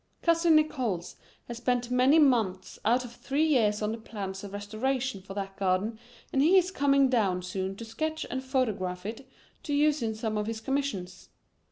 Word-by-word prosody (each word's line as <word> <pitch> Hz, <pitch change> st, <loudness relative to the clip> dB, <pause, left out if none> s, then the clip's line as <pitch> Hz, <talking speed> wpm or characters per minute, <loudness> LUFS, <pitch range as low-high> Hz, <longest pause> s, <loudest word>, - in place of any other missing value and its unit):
"Cousin 335 Hz, -1 st, +4 dB
Nickols 250 Hz, -, 0 dB, 0.3 s
has 235 Hz, -, -6 dB
spent 245 Hz, 0 st, -1 dB
many 255 Hz, +5 st, +5 dB
months 220 Hz, -11 st, +2 dB
out 245 Hz, +3 st, +2 dB
of 240 Hz, -, -9 dB
three 280 Hz, +5 st, 0 dB
years 220 Hz, -8 st, +2 dB
on 210 Hz, -, 0 dB
the 225 Hz, -, -5 dB
plans 195 Hz, -3 st, -6 dB
of 200 Hz, -, -7 dB
restoration 220 Hz, +3 st, -2 dB
for 195 Hz, +1 st, -10 dB
that 195 Hz, -1 st, -4 dB
garden, 195 Hz, +4 st, 0 dB, 0.3 s
and 270 Hz, -, +3 dB
he 340 Hz, +7 st, +6 dB
is 370 Hz, 0 st, +3 dB
coming 275 Hz, -5 st, +3 dB
down 200 Hz, -8 st, +1 dB
soon 190 Hz, +1 st, -3 dB
to 230 Hz, -, -8 dB
sketch 315 Hz, +8 st, -3 dB
and 260 Hz, +1 st, -3 dB
photograph 205 Hz, -9 st, -1 dB
it 235 Hz, +5 st, -7 dB, 0.3 s
to 290 Hz, -, -2 dB
use 300 Hz, 0 st, +3 dB
in 220 Hz, -1 st, -1 dB
some 220 Hz, -1 st, -2 dB
of 210 Hz, -, -2 dB
his 225 Hz, -1 st, -3 dB
commissions. 240 Hz, -8 st, -3 dB
235 Hz, 185 wpm, -28 LUFS, 200-275 Hz, 0.3 s, he